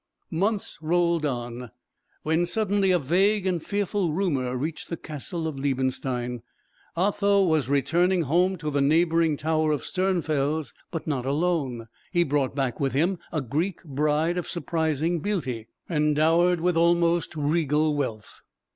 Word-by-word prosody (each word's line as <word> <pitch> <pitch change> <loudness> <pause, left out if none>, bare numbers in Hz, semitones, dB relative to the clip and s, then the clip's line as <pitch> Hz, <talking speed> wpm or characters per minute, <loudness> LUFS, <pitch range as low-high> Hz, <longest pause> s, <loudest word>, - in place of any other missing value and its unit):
Months 200 +3 -1
rolled 170 -1 +1
on, 120 -2 -5 0.5
when 160 +3 +1
suddenly 205 -2 +1
a 180 - +4
vague 190 +7 +2
and 180 -3 0
fearful 200 -3 -1
rumour 140 -9 0
reached 155 +5 -4
the 170 - -3
castle 160 +2 -4
of 145 -4 -5
Liebenstein. 130 -3 -1 0.6
Otho 200 +1 +3
was 155 -7 +1
returning 170 +6 +2
home 180 +6 +2
to 150 -2 -4
the 140 0 +1
neighbouring 160 +1 +3
tower 155 0 +1
of 145 -5 -1
Sternfels; 155 -6 -1 0.2
but 165 - -5
not 135 -5 -2
alone. 140 -6 -1 0.2
He 175 -2 +3
brought 140 -4 0
back 135 -4 -1
with 135 -2 0
him 170 +6 +1
a 155 - -1
Greek 155 - -2
bride 150 +3 0
of 175 - -6
surprising 165 -1 -1
beauty, 145 - -3 0.2
and 150 -3 +1
dowered 165 +3 +3
with 180 0 +1
almost 170 0 +2
regal 150 0 +1
wealth. 115 -7 -4
160 Hz, 145 wpm, -26 LUFS, 140-175 Hz, 0.6 s, a